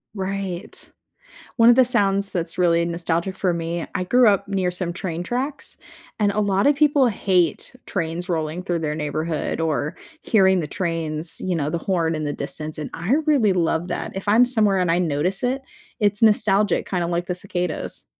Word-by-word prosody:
Right. 195 -2 -5 0.7
One 230 -1 +6
of 240 - +5
the 260 - +6
sounds 200 -5 +1
that's 175 0 -3
really 170 -1 +3
nostalgic 170 +2 -2
for 185 -2 +1
me- 170 0 -3
I 185 - -1
grew 245 +5 +5
up 200 -1 +2
near 190 -2 0
some 180 -1 -3
train 175 -1 -4
tracks, 260 +8 -4 0.4
and 205 -2 +2
a 210 - 0
lot 200 +1 +1
of 290 - +5
people 285 -2 +4
hate 185 - 0
trains 175 0 -3
rolling 160 0 -2
through 175 -3 -2
their 150 -1 -2
neighborhood 155 +1 -2
or 155 0 -1 0.3
hearing 190 -4 +3
the 155 - -3
trains 165 -1 -3
you 185 -2 -1
know, 150 -1 -1
the 170 - -1
horn 165 -2 0
in 155 -1 -3
the 145 - -2
distance, 155 0 -5
and 150 - -5
I 175 +9 -2
really 260 -10 +3
love 170 -1 0
that. - - -4
If 195 +1 -6
I'm 225 +4 +6
somewhere 215 -6 +2
and 180 -2 +1
I 170 - +2
notice 175 +3 0
it, 260 +2 -1 0.4
it's 205 +1 +1
nostalgic, 210 -1 +3
kinda 180 -3 -1
like 175 0 -2
the 180 - -2
cicadas. 180 -3 -3
180 Hz, 190 wpm, -22 LUFS, 165-205 Hz, 0.7 s, One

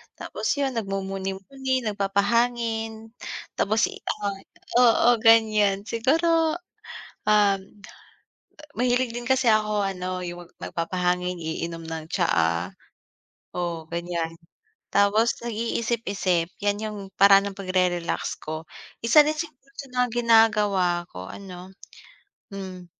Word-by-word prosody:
Tapos - - -2
yun, 275 -2 0
nagmumuni-muni, 195 +6 -3
nagpapahangin. 225 +2 0 0.5
Tapos 220 +2 +2
i - - -9 0.3
ah, 200 -1 -1 0.4
oo, 240 0 +5
ganiyan. 215 -3 +4
Siguro, 320 +8 +2 0.7
um, 205 -2 +4 1.2
mahilig 250 0 +2
din 240 +1 -6
kasi 260 -2 +3
ako 215 -1 +2
ano, 185 -1 -3
yung 175 0 -7
mag - - -29 0.2
nagpapahangin, 180 +1 -1
iinom 165 +1 -4
ng 160 -1 -6
tsaa. 85 - +1 0.8
Oo, 170 -2 -3
ganiyan. 170 -1 -2 0.6
Tapos 210 +3 +3
nag-iisip-isip. 220 -6 -1
Yan 205 +1 0
yung 215 -1 -4 0.2
paraan 200 0 +6
ng 195 - -12
pagre-relax 185 -2 -1
ko. 155 +1 -5 0.4
Isa 235 +7 +7
din 305 - 0
sa 330 - -2 0.4
mga 250 0 +1
ginagawa 210 -6 +4
ko 90 0 -8
ano, 185 -2 -9 0.9
hmm, 185 -2 -7
200 Hz, 105 wpm, -25 LUFS, 180-230 Hz, 1.2 s, Isa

